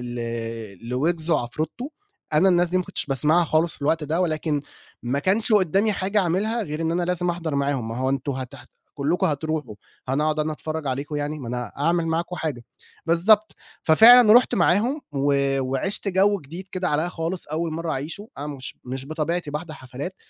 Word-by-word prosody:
ل 115 Hz, -2 st, -6 dB
لويجز 160 Hz, +6 st, -1 dB
وعفرتو، 155 Hz, -, -2 dB, 0.4 s
أنا 185 Hz, +6 st, +5 dB
الناس 175 Hz, -1 st, +3 dB
دي 185 Hz, -, +1 dB
ما 185 Hz, -, 0 dB
كُنتش -, -, -3 dB
باسمعها 150 Hz, +5 st, +2 dB
خالص 160 Hz, +1 st, +1 dB
في -, -, -19 dB
الوقت 160 Hz, +2 st, +1 dB
ده 160 Hz, +4 st, 0 dB
ولكن، 155 Hz, -3 st, -1 dB, 0.4 s
ما 125 Hz, +4 st, -1 dB
كانش 210 Hz, +8 st, +1 dB
قدامي 200 Hz, +2 st, +3 dB
حاجة 195 Hz, +3 st, 0 dB
أعملها 205 Hz, +6 st, 0 dB
غير 155 Hz, -2 st, -5 dB
إن 165 Hz, -, 0 dB
أنا 175 Hz, +1 st, 0 dB
لازم 180 Hz, 0 st, -1 dB
أحضر 170 Hz, -4 st, -2 dB
معاهم، 140 Hz, -4 st, -1 dB
ما 115 Hz, -, -5 dB
هو 130 Hz, +1 st, 0 dB
أنتم 135 Hz, +1 st, -1 dB
هتح 130 Hz, -1 st, -7 dB, 0.3 s
كلّكم 160 Hz, +7 st, 0 dB
هتروحوا، 150 Hz, -6 st, -3 dB, 0.3 s
أنا 135 Hz, +3 st, +1 dB
هاقعد 155 Hz, 0 st, 0 dB
أنا 155 Hz, 0 st, 0 dB
أتفرج 155 Hz, -1 st, -5 dB
عليكم 140 Hz, +3 st, -3 dB
يعني، 145 Hz, +1 st, -3 dB
ما 130 Hz, -, -7 dB
أنا 125 Hz, -2 st, -4 dB
أعمل 165 Hz, +3 st, +1 dB
معاكم 170 Hz, +2 st, -2 dB
حاجة، 145 Hz, -9 st, -4 dB, 0.4 s
بالضبط، 205 Hz, +6 st, +4 dB, 0.3 s
ففعلًا 225 Hz, +7 st, +8 dB
رُحت 245 Hz, +1 st, +5 dB
معاهم 220 Hz, -, +2 dB
و 140 Hz, 0 st, +1 dB, 0.3 s
وعشت 135 Hz, +11 st, -1 dB
جو 200 Hz, +2 st, +3 dB
جديد 170 Hz, +7 st, -9 dB
كده 185 Hz, -1 st, -1 dB
عليّا 150 Hz, +3 st, +1 dB
خالص 170 Hz, +1 st, -4 dB
أول 160 Hz, +2 st, -2 dB
مرّه 165 Hz, 0 st, -3 dB
أعيشوا 160 Hz, +10 st, -5 dB
أنا 145 Hz, -, -5 dB
مش 140 Hz, -3 st, -7 dB
مش 130 Hz, +1 st, -5 dB
بطبيعتي 155 Hz, +1 st, -2 dB
باحضر 155 Hz, +2 st, -5 dB
حفلات، 135 Hz, +6 st, -7 dB
155 Hz, 185 wpm, -23 LUFS, 140-180 Hz, 0.4 s, ففعلًا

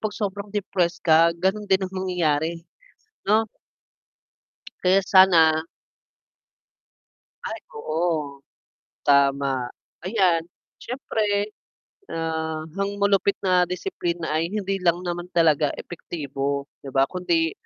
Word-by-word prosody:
'pag 215 Hz, -1 st, -3 dB
sobrang 200 Hz, 0 st, -3 dB
depressed 180 Hz, -3 st, -1 dB
ka, 160 Hz, 0 st, +7 dB, 0.3 s
ganun 205 Hz, +2 st, +1 dB
din 190 Hz, -, +4 dB
ang 185 Hz, -, -7 dB
mangyayari 165 Hz, -5 st, 0 dB, 0.8 s
'no. 220 Hz, +2 st, +3 dB, 1.3 s
Kaya 190 Hz, +2 st, +4 dB
sana. 165 Hz, -5 st, +6 dB, 1.8 s
Ay -, -, -4 dB
oo, 155 Hz, -, -2 dB, 0.6 s
tama, 140 Hz, -2 st, +2 dB, 0.4 s
ayan 180 Hz, -5 st, +2 dB, 0.3 s
syempre 210 Hz, -5 st, -1 dB, 0.6 s
ah, 160 Hz, -1 st, -3 dB
ang 200 Hz, 0 st, -2 dB
malupit 200 Hz, 0 st, +2 dB
na 180 Hz, -2 st, +3 dB
disiplina 175 Hz, -, -3 dB
ay 160 Hz, +2 st, 0 dB
hindi 195 Hz, -1 st, -2 dB
lang 175 Hz, 0 st, +1 dB
naman 175 Hz, 0 st, -4 dB
talaga 155 Hz, -3 st, +4 dB
epektibo 140 Hz, -4 st, -4 dB, 0.2 s
'di 140 Hz, -, -10 dB
ba, 135 Hz, 0 st, +3 dB
kundi 165 Hz, -1 st, 0 dB
175 Hz, 100 wpm, -24 LUFS, 155-195 Hz, 1.8 s, ka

